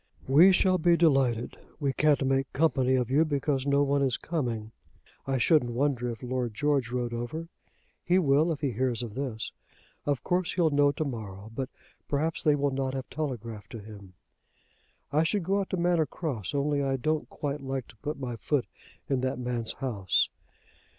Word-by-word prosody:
"We 160 +9 +7
shall 185 0 +3
be 170 +1 +4
delighted. 135 -8 +2 0.2
We 140 -3 0
can't 150 -2 +3
make 135 0 +1
company 135 -4 +2
of 125 -1 0
you, 150 +4 +5
because 145 -3 -1
no 140 0 +4
one 140 0 +1
is 130 -3 +2
coming. 120 -10 -3 0.6
I 135 -1 +1
shouldn't 125 -1 +3
wonder 125 -1 0
if 115 +1 -6
Lord 125 -3 -2
George 140 -3 +1
rode 120 -1 -2
over. 140 +8 -4 0.5
He 180 - +3
will 155 -1 +3
if 150 - -4
he 140 -3 0
hears 125 +1 -1
of 115 -3 -6
this. 125 -3 -4 0.6
Of 145 -3 0
course 180 -1 0
he'll 165 -4 +2
know 145 0 +4
to 155 +2 -3
morrow; 110 -5 -6
but 130 +2 -3 0.4
perhaps 155 +3 0
they 150 -1 +4
will 140 -1 +1
not 135 0 -2
have 130 -2 -5
telegraphed 115 -8 -5
to 115 - -5
him. 100 -3 -12 1.0
I 150 - +3
should 170 +4 +1
go 195 +4 +1
out 195 - -3
to 185 - -1
Manor 170 -3 +2
Cross, 135 - -4
only 145 0 +1
I 135 -1 0
don't 155 +4 -1
quite 145 0 -4
like 135 -2 -4
to 115 - -16
put 145 +4 -5
my 125 -3 -4
foot 140 +1 0 0.4
in 135 -2 0
that 130 -1 -1
man's 120 -2 -2
house." 105 -9 +1
135 Hz, 185 wpm, -28 LUFS, 120-150 Hz, 1.0 s, We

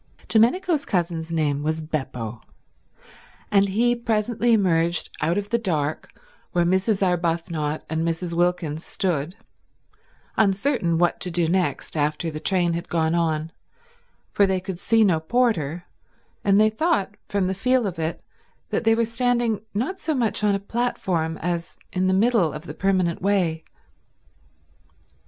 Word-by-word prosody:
Domenico's 290 - +3
cousin's 170 -8 -2
name 150 -3 0
was 155 +2 -1
Beppo, 125 -7 -4 1.1
and 200 -1 +4
he 240 +5 +2
presently 235 0 0
emerged 170 -5 +2
out 165 +5 +1
of 205 0 -3
the 235 - +2
dark 155 -8 -2 0.4
where 175 -1 +2
Mrs. 190 +3 +2
Arbuthnot 165 -3 -1
and 160 0 -2
Mrs. 165 +1 -2
Wilkins 170 -2 0
stood, 175 -2 -2 1.0
uncertain 200 - +2
what 175 +1 +2
to 180 - -3
do 170 -1 0
next 180 0 -1
after 155 +2 0
the 155 - -5
train 175 -1 +2
had 170 +1 -4
gone 160 -1 +1
on, 160 -2 0 0.8
for 200 - +3
they 190 -1 +1
could 185 -1 -6
see 225 +3 +3
no 180 -6 +3
porter 175 - 0 0.6
and 200 0 +4
they 215 0 +5
thought 220 - 0 0.2
from 200 -2 0
the 185 - 0
feel 250 +5 +1
of 180 -4 -4
it 160 +1 -3 0.5
that - - -1
they 225 0 +5
were 230 0 +2
standing 235 -2 +1
not 265 - -2
so 315 -5 -1
much 230 -4 0
on 205 -1 +3
a - - -1
platform 190 -7 -2
as 170 -1 -3 0.2
in 185 0 +1
the 185 - +3
middle 205 -6 +3
of - - -7
the - - -7
permanent 185 -3 0
way. 180 -5 +1
185 Hz, 150 wpm, -23 LUFS, 165-215 Hz, 1.1 s, they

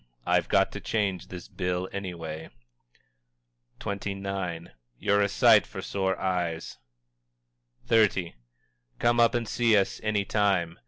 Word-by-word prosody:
I've - - +2
got - - +3
to - - -6
change 100 -5 -1
this 90 -1 -9
bill 90 0 -2
anyway_." 85 -5 -6 1.3
XXIX. 95 -4 -4 0.3
"You're 100 - +2
a 100 - +2
sight - - +5
for - - -7
sore 95 -2 -1
eyes!" 90 -7 -2 1.1
XXX. 100 -6 +3 0.7
"_Come 120 0 +2
up 115 0 +4
and 120 -2 -1
see 115 -3 +3
us 95 - 0
any 105 -2 0
time. 95 -6 +1
95 Hz, 120 wpm, -27 LUFS, 90-105 Hz, 1.3 s, sight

